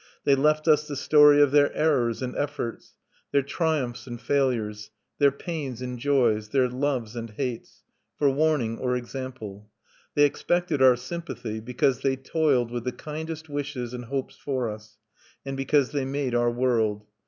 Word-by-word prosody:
They 140 - +4
left 150 +3 +2
us 150 -1 +4
the 145 - -4
story 145 +1 +6
of 140 - +2
their 145 0 +4
errors 130 -6 +1
and 125 - -4
efforts, 145 -5 -4 0.4
their 140 - +3
triumphs 140 -5 -2
and 120 -1 -6
failures, 115 -5 -1 0.3
their 140 -1 +6
pains 140 -3 -5
and 125 -1 -5
joys, 120 -6 +2
their 130 +1 +3
loves 125 -3 -2
and 115 -1 -5
hates, 120 +2 -5 0.3
for 145 - +2
warning 140 -5 +1
or 125 -1 0
example. 120 -5 -7 0.5
They 145 - +5
expected 165 +1 +1
our 130 -1 +7
sympathy, 125 -4 -6
because 125 +2 0
they 135 -1 +1
toiled 135 -3 +1
with 120 0 -4
the 125 - 0
kindest 160 +3 -6
wishes 140 -4 -4
and 125 -1 -6
hopes 135 +2 -4
for 130 -5 -2
us, 105 0 -12 0.5
and 135 0 -4
because 135 0 +2
they 145 -2 -1
made 135 -2 -2
our 120 0 +3
world. 115 -4 0
130 Hz, 165 wpm, -26 LUFS, 120-145 Hz, 0.5 s, our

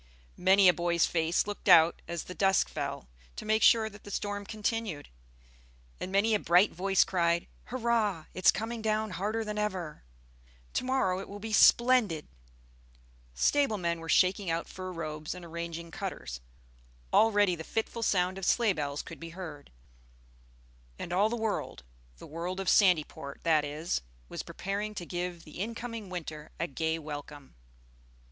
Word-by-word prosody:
Many 190 +1 +6
a 180 - +7
boy's 170 -1 +2
face 165 0 +1
looked 205 0 -4
out 165 -2 +7
as 170 -1 -4
the 180 - -8
dusk 195 +1 +3
fell, 60 - -4 0.3
to - - -7
make 215 +1 +2
sure 225 -1 +6
that 210 -1 -12
the - - -10
storm 205 0 -3
continued; 215 -7 -3 0.9
and 185 - -5
many 205 +3 +3
a 210 - +3
bright 180 +3 +4
voice 195 +2 +3
cried, 170 -2 +1 0.2
"Hurrah! 225 -8 0
It's 185 - +4
coming 225 +3 -4
down 215 -1 0
harder 215 +5 -2
than 210 0 -3
ever! 185 -7 -3 0.7
To - - 0
morrow 255 -8 +1
it 195 - -8
will 200 - -7
be 220 +1 -6
splendid!" 235 -9 +5 1.1
Stable 275 - +2
men 170 -2 -1
were 165 0 -9
shaking 185 +1 +3
out 165 +1 -1
fur 185 0 -7
robes 155 -2 -5
and 180 -1 -9
arranging 170 0 -6
cutters. - - -5 0.7
Already 205 -4 +4
the 160 - -7
fitful 225 +5 -3
sound 190 -3 +1
of 190 - -4
sleigh 230 -1 +3
bells 145 -3 -3
could - - -10
be 165 - -7
heard; 155 -6 -8 1.3
and 170 - -5
all 200 +4 +3
the 240 - -2
world 220 - -3 0.3
the - - -11
world 175 +4 -5
of 195 - 0
Sandyport 155 -7 +2
that 155 -3 +3
is 150 - -2 0.3
was - - -4
preparing 205 +2 -4
to 175 - -5
give 175 -1 -4
the 155 - -11
in 230 +3 -3
coming 230 -4 -6
winter 155 -4 -6
a 165 - 0
gay 160 +1 -2
welcome. 145 -2 -8
185 Hz, 165 wpm, -30 LUFS, 165-210 Hz, 1.3 s, a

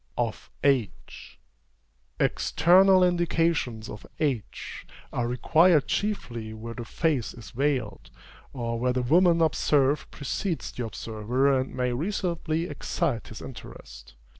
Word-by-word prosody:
OF 115 -2 -3
AGE. 130 -10 -1 0.8
External 185 +2 +4
indications 165 -10 +1
of 105 - -9 0.2
age 135 -8 -3 0.3
are 120 -1 -1
required 155 +6 +4
chiefly 120 - -3
where 115 +1 -7
the 120 0 -7
face 145 -2 -1
is 120 - -11
veiled, 130 -6 -2 0.4
or 115 -2 -3
where 125 +1 +1
the 125 0 0
woman 170 +5 +4
observed 145 -2 +2
precedes 165 +5 -3
the 125 - -5
observer 115 +6 0
and 130 - -4
may 125 -1 0
reasonably 170 +1 -1
excite 165 -6 -2
his 110 - -9
interest. 60 - -11
135 Hz, 115 wpm, -26 LUFS, 115-165 Hz, 0.8 s, External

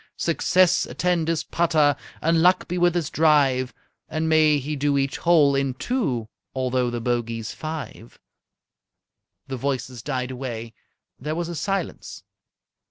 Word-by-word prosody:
Success 180 +2 +2
attend 175 -3 0
his 165 -1 0
putter! 155 -4 +2 0.3
And 165 0 +3
luck 180 +2 +4
be 180 +1 -2
with 175 0 +3
his 170 -5 -1
drive! 140 -5 +3 0.4
And 160 0 -1
may 155 -2 +4
he 145 +2 -3
do 145 0 +1
each 135 0 0
hole 155 -5 +4
in 135 -2 0
two, 135 - -1 0.3
Although 130 -1 0
the 120 0 -3
bogey's 115 -2 -2
five!"_ 155 -7 -7 1.3
The 135 -1 -4
voices 130 -2 -3
died 130 -1 -3
away. 120 -3 -6 0.5
There 150 +4 -3
was 170 0 -3
a 170 - -5
silence. 190 +4 -4
145 Hz, 140 wpm, -24 LUFS, 130-165 Hz, 1.3 s, luck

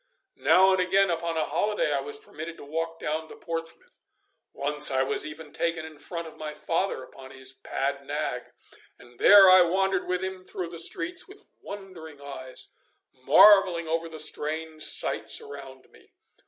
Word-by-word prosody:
Now 190 +1 +5
and 190 - +2
again 190 +1 +3
upon 165 0 -2
a 155 - +1
holiday 210 -7 0
I 140 - +1
was 145 +1 -5
permitted 160 +3 -9
to - - -11
walk 165 +2 -4
down 160 +1 -3
to - - -11
Portsmouth 165 -1 -6 0.5
once 150 +1 +1
I 130 -1 +1
was 135 - -1
even 155 0 -10
taken 165 -1 -1
in 155 -2 -12
front 170 +2 -6
of 160 - -14
my 155 -1 -6
father 165 -1 -2
upon 130 0 -13
his 130 0 -6
pad - - -3
nag, - - -3 0.5
and 120 0 -19
there 200 -1 +9
I 185 0 +8
wandered 190 +2 +1
with 180 0 -1
him 190 -1 -5
through 180 -2 -5
the 170 -1 -7
streets 360 - -2
with 395 +2 -14 0.2
wondering 185 -7 -10
eyes, 135 -2 -8 0.4
marvelling 170 +5 +5
over 165 +1 -2
the 160 - -9
strange 155 +1 -3
sights - - +1
around 135 -2 -11
me. - - -22
165 Hz, 170 wpm, -26 LUFS, 150-185 Hz, 0.5 s, there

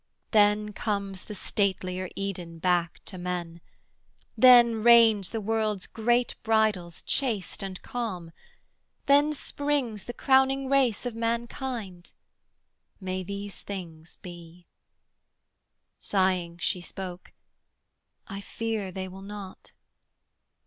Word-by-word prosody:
Then 210 -1 +3
comes 200 -3 -2
the 210 - -7
statelier 185 -2 -1
Eden 180 -4 -5
back 175 0 0
to 185 - -7
men: 175 -2 -4 0.7
Then 240 -3 +7
reign 230 -2 +7
the 225 - -2
world's 215 -2 -1
great 240 +2 +1
bridals, 215 -6 +1
chaste 225 -8 -1
and 190 -2 -5
calm: 205 -10 -4 0.7
Then 285 +2 +5
springs 285 -7 -2
the 240 - -5
crowning 265 +1 +3
race 260 -5 +2
of 245 - -2
humankind. 230 -4 -4 0.9
May 185 -1 -3
these 200 +1 -5
things 170 -5 -8
be!' 175 -1 -11 1.3
Sighing 185 -3 0
she 180 +1 -1
spoke 180 0 -7 1.0
'I 195 -2 -6
fear 220 -2 -3
They 190 +1 -5
will 190 +1 -10
not.' 200 -1 -9
200 Hz, 105 wpm, -27 LUFS, 185-230 Hz, 1.3 s, Then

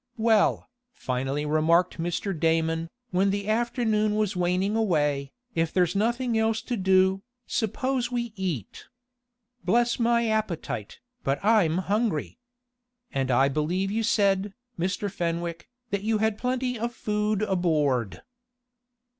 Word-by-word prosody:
"Well," 220 -2 +3 0.3
finally 135 +3 -2
remarked 165 +4 +2
Mr. 175 +4 -2
Damon, 165 0 0 0.2
when 190 +2 +2
the 200 +1 -2
afternoon 220 -2 +1
was 210 -2 0
waning 180 +3 +1
away, 145 -10 +1 0.2
"if 165 -3 0
there's 180 0 +1
nothing 235 +2 +1
else 220 0 +1
to 245 - -2
do, 190 -1 +3 0.2
suppose 250 +3 -1
we 235 -2 -2
eat. 175 - -4 0.8
Bless 235 +7 +2
my 235 0 +2
appetite, 190 - -2 0.3
but 135 +1 +1
I'm 200 -7 +4
hungry! 200 -1 -1 0.7
and 135 -1 -1
I 130 +2 +4
believe 170 +7 -1
you 225 +2 0
said, 200 -3 +1 0.2
Mr. 185 +4 -1
Fenwick, 170 0 -3 0.2
that 200 -1 0
you 220 +1 +1
had 220 0 +1
plenty 250 -1 -1
of 235 +1 -3
food 210 0 -1
aboard." 150 - 0
195 Hz, 125 wpm, -26 LUFS, 165-220 Hz, 0.8 s, I'm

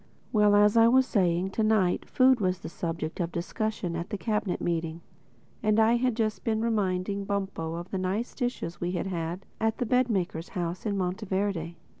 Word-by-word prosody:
Well, 210 -1 +5
as 210 +1 +5
I 225 0 +7
was 260 +2 +5
saying, 185 -4 +1
to 220 - -1
night 215 -5 +2
food 255 -1 +5
was 185 -2 +1
the - - -6
subject 165 -1 -4
of 170 -1 -1
discussion 180 0 -3
at 170 +1 -4
the 205 - -3
Cabinet 210 -3 -1
Meeting; 165 -1 -2 0.6
and 215 0 +2
I 225 +2 +5
had 250 -1 +1
just 220 -2 -1
been 220 -1 0
reminding 200 -3 0
Bumpo 190 -5 -2
of 175 +2 -7
the 190 - -1
nice 195 +6 -2
dishes 245 -9 -3
we 175 +1 -1
had 180 - -2
had 175 0 -4
at 220 0 0
the 245 - -1
bed 250 +2 +2
maker's 175 -5 -2
house 175 +3 -3
in 200 -1 -1
Monteverde. 190 -2 -2
195 Hz, 190 wpm, -28 LUFS, 175-220 Hz, 0.6 s, I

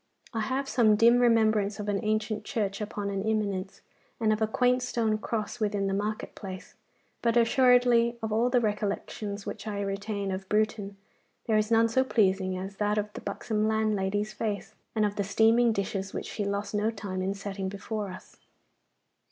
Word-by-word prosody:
I 225 - -1
have 260 +5 -1
some 225 -5 +4
dim 235 +3 +5
remembrance 220 -4 +3
of 210 - -4
an 200 -1 -1
ancient 215 0 -1
church 205 -5 -2
upon 205 -1 -3
an 195 -1 -2
eminence, 210 -3 -2 0.4
and 220 -2 +3
of 215 - -3
a 220 - +3
quaint 250 +3 +2
stone 225 -3 0
cross 220 +1 -3
within 205 -2 0
the 195 - 0
market 210 +2 -2
place, 190 -2 -8 0.5
but 235 0 +2
assuredly, 240 -1 +4
of 220 - -2
all 235 +3 +2
the 250 0 +3
recollections 205 -1 -3
which 220 - -6
I 205 -1 -3
retain 200 0 -3
of 190 0 -5
Bruton 210 -2 0 0.5
there 220 - +1
is 215 0 +2
none 230 0 +5
so 260 +3 +2
pleasing 190 -6 +1
as 190 +1 -6
that 210 0 +1
of 210 0 -2
the - - -7
buxom 210 +1 -1
landlady's 215 -1 0
face, 210 -3 -3 0.2
and 215 -1 +3
of 205 0 -2
the 200 - +1
steaming 225 +4 +4
dishes 195 -2 -3
which - - -3
she 205 - -3
lost 200 +1 -2
no 210 +1 +1
time 200 -4 -4
in 195 +1 -1
setting 195 -1 -4
before 205 +1 -4
us. 185 - -11
210 Hz, 185 wpm, -28 LUFS, 200-225 Hz, 0.5 s, dim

